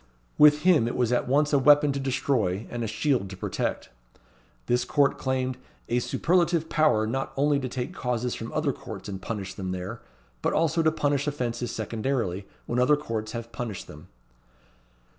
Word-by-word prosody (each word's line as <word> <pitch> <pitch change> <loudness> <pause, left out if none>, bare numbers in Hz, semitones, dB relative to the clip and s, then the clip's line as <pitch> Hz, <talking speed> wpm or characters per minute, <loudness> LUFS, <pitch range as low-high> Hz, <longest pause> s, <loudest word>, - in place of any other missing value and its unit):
With 150 0 +7
him 170 -10 +5
it 120 - -3
was 125 -2 +1
at 125 - +1
once 150 +3 +2
a 140 - +5
weapon 145 +1 +6
to 140 - -2
destroy, 125 -7 0
and 120 -1 -3
a - - -2
shield 110 -2 0
to 95 - -8
protect. - - -3 0.8
This 125 0 +1
court 140 +2 +2
claimed 130 -1 -1 0.3
"a 120 - +2
superlative 170 +4 +1
power 150 -9 +3
not 135 +5 -2
only 145 +1 +3
to 130 -2 -4
take 125 0 -4
causes 125 -1 -2
from 115 - -6
other 150 -3 0
courts 105 -5 -9
and 95 -2 -6
punish 95 -2 -4
them 95 -2 -4
there, 95 +6 -6 0.4
but - - 0
also 165 +1 +2
to 160 -1 +3
punish 145 -2 0
offences 120 -4 -2
secondarily, 110 -3 -2 0.2
when 120 - -1
other 145 +4 +4
courts 110 -6 -4
have 115 -1 -6
punished 115 -5 -5
them." 75 - -13
125 Hz, 180 wpm, -26 LUFS, 110-145 Hz, 0.8 s, With